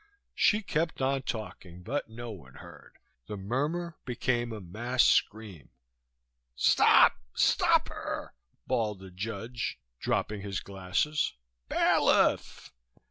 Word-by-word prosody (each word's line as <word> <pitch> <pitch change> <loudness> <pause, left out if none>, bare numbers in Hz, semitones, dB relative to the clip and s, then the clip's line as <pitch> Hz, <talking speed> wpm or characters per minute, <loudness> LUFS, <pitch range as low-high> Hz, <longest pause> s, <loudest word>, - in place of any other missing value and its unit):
She 215 +1 +3
kept 165 -2 -1
on 135 0 +1
talking, 95 -7 -7
but 135 +3 -3
no 120 +1 -7
one 70 -11 -12
heard. - - -14 0.3
The 105 - -5
murmur 150 - -2
became 120 -1 -1
a 110 - -5
mass 120 +8 0
scream. 105 - +1 0.9
"Stop, - - +5 0.2
stop - - +3
her!" - - -5 0.3
bawled 110 -5 0
the 95 0 -12
judge, 115 - -4 0.2
dropping 105 -2 -1
his 100 -2 -3
glasses. 100 +11 -1 0.4
"Bailiff!" - - +2
115 Hz, 110 wpm, -29 LUFS, 95-130 Hz, 0.9 s, Stop